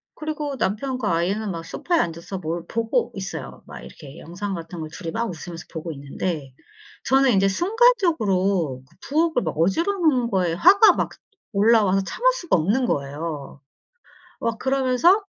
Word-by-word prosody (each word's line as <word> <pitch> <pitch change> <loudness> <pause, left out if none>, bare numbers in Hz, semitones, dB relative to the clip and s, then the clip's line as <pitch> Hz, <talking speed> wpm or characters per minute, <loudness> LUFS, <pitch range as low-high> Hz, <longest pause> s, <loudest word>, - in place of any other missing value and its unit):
그리고 300 -2 -4
남편과 220 +1 -1
아이는 195 +5 -1
막 165 -1 -6
소파에 345 - -1
앉아서 170 +3 -3
뭘 165 0 -4
보고 230 - 0
있어요. - - -7
막 - - -10
이렇게 140 -3 -12
영상 190 +5 -5
같은 170 0 -7
걸 155 -1 -5
2 170 - -8
이 - - -2
막 235 +5 -1
웃으면서 170 0 -8
보고 165 +1 -5
있는데 140 0 -5 0.5
저는 270 -1 +4
인제 195 0 +3
순간적으로 200 - +2
그 - - -26
부엌을 315 -3 +2
막 160 -2 -3
어질러 195 - +2
놓은 285 -10 +2
거에 180 -4 +1
화가 385 - +7
막 - - -1 0.4
올라와서 200 -2 +4
참을 - - +1
수가 345 - 0
없는 215 +11 +1
거예요. 145 -2 -4 0.8
막 230 -1 -2
그러면서 270 - +3
200 Hz, 330 characters per minute, -23 LUFS, 165-275 Hz, 0.8 s, 화가